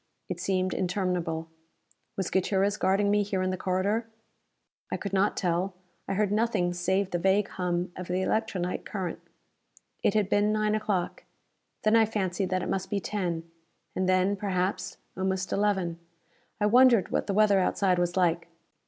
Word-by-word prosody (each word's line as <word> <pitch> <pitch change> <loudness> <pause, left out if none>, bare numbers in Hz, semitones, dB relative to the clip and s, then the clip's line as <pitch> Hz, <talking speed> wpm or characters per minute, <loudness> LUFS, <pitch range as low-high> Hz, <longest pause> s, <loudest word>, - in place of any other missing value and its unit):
It 180 -2 -4
seemed 185 +1 0
interminable. 175 -3 -1 0.7
Was 190 -2 -2
Gutierrez 195 +2 +1
guarding 200 0 +2
me 210 0 +3
here 195 -2 -1
in 185 - 0
the - - -1
corridor? 195 +5 0 0.8
I - - 0
could 200 -2 -5
not 195 +1 +2
tell; 180 +1 0 0.3
I 195 - -1
heard 205 0 +1
nothing 210 -5 +1
save 190 +2 0
the 175 - 0
vague 195 +3 +2
hum 175 0 -2
of 180 -1 -6
the 185 +1 0
electronite 190 -5 -1
current. 185 -5 -4 0.8
It 200 - +2
had 210 -3 +3
been 205 +1 +2
9 215 0 +1
o'clock. 210 -4 -2 0.6
Then 215 +1 +4
I 225 -1 +5
fancied 195 -3 -1
that 185 -1 0
it - - -3
must 190 0 -2
be 205 - 0
10. 175 -5 -3 0.5
And 185 0 0
then, 185 +2 +3
perhaps, 190 -1 -2 0.2
almost 190 0 -1
11. 190 -5 0 0.6
I 210 - +2
wondered 240 -1 +5
what - - 0
the 200 - 0
weather 205 -2 +5
outside 185 -1 +2
was 175 +1 0
like. 170 -2 +2
190 Hz, 165 wpm, -28 LUFS, 180-205 Hz, 0.8 s, I